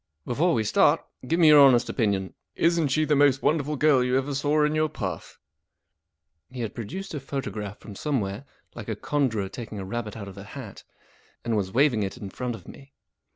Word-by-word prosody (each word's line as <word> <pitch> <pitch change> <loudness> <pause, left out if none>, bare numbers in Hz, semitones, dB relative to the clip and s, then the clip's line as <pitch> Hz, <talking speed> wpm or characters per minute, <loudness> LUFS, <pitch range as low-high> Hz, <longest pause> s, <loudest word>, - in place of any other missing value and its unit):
Before 160 +8 +1
we 110 - +1
start, 105 - +3 0.2
give 165 +5 +1
me 160 -3 +7
your 150 -1 +8
honest 130 -4 +6
opinion. 100 -5 -1 0.2
Isn't 165 -2 +2
she 155 +3 +1
the 150 0 +2
most 140 -2 +3
wonderful 150 -1 +1
girl 145 -3 +4
you 125 +1 +1
ever 135 +2 -2
saw 145 +2 +1
in 150 - 0
your 155 0 +1
puff? - - -6 0.6
" 80 -1 -55
He 125 -1 -7
had 115 - -4
produced 185 - -6
a 150 - -3
photograph 110 -7 -5
from 105 - -11
somewhere, 110 -2 -2 0.3
like 115 -2 -8
a 110 - -1
conjurer 115 -5 -1
taking 110 +1 -8
a 95 - -5
rabbit 110 +1 -5
out 100 -2 -7
of 100 0 -10
a - - -8
hat, 110 0 -10 0.6
and 120 - -1
w 110 -2 +2
as 95 -1 -7
waving 125 -2 +3
it 100 +4 -3
in 100 -5 -8
front 125 -2 -4
of - - -14
me. 140 0 -13
125 Hz, 210 wpm, -26 LUFS, 105-145 Hz, 0.6 s, your